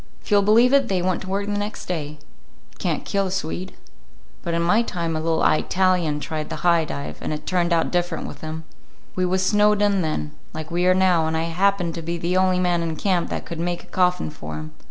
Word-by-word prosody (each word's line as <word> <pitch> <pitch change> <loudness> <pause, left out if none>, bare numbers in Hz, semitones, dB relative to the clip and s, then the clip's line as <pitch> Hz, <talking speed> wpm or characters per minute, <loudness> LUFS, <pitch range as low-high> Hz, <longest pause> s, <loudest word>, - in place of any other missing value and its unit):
If - - -13
you'll 205 -1 +6
believe 230 +6 +5
it, 275 -2 +4
they 190 -4 0
went 185 -1 0
to 190 - -7
work 200 +1 -1
the 205 - -3
next 205 +1 -3
day. 160 -5 -2 0.6
You - - -25
can't - - -1
kill 200 -1 0
a - - -4
Swede. 185 0 -3 0.7
But 170 -1 -2
in 170 - +1
my 210 +7 +4
time 170 -7 -2
a - - 0
little 165 0 +1
Eyetalian 180 -2 +2
tried 155 0 -4
the - - -4
high 170 -2 +4
dive, 140 -1 -6
and - - -3
it 150 - -5
turned 175 -1 +1
out 165 -1 +2
different 175 -2 -1
with 145 - -8
him. 160 0 -5 0.5
We 185 -1 0
was 185 +1 +1
snowed 210 +1 +4
in 205 -2 +2
then, 115 - -2 0.2
like 160 +1 -6
we 175 +1 +1
are 185 - +5
now, 180 -4 +3
and 160 0 0
I 160 - 0
happened 175 +1 +1
to 165 - -5
be 170 +1 -3
the 170 +2 -1
only 185 0 +3
man 175 -1 +1
in 165 -1 -2
camp 180 0 0
that - - -4
could 170 - -6
make 175 +1 -2
a - - -22
coffin 180 - +1
for 75 0 -7
him. 75 0 -7
175 Hz, 240 wpm, -23 LUFS, 160-190 Hz, 0.7 s, you'll